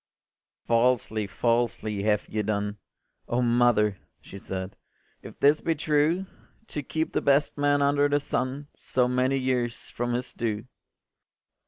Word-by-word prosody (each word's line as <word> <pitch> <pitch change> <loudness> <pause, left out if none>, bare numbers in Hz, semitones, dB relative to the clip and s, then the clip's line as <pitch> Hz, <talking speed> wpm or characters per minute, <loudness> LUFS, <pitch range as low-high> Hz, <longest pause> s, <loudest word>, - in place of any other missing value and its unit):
” - - -68
“Falsely, 115 -3 +1
falsely 115 -2 0
have 105 0 +1
ye 110 - -2
done, 105 0 -2 0.5
O 120 - 0
mother,” 120 -5 +3 0.2
she 100 - -11
said, 95 0 -5 0.5
“if - - -12
this 145 +2 +4
be 165 - 0
true, 155 +4 +1 0.4
To 150 - -3
keep 160 +3 -3
the - - +1
best 140 +1 +2
man 145 0 +2
under 145 0 +3
the 145 0 +2
sun 140 0 -3
So 125 -1 0
many 130 +2 +1
years 125 -2 -1
from 120 0 -2
his 125 0 -3
due. 110 -1 -3
125 Hz, 145 wpm, -26 LUFS, 110-145 Hz, 0.5 s, this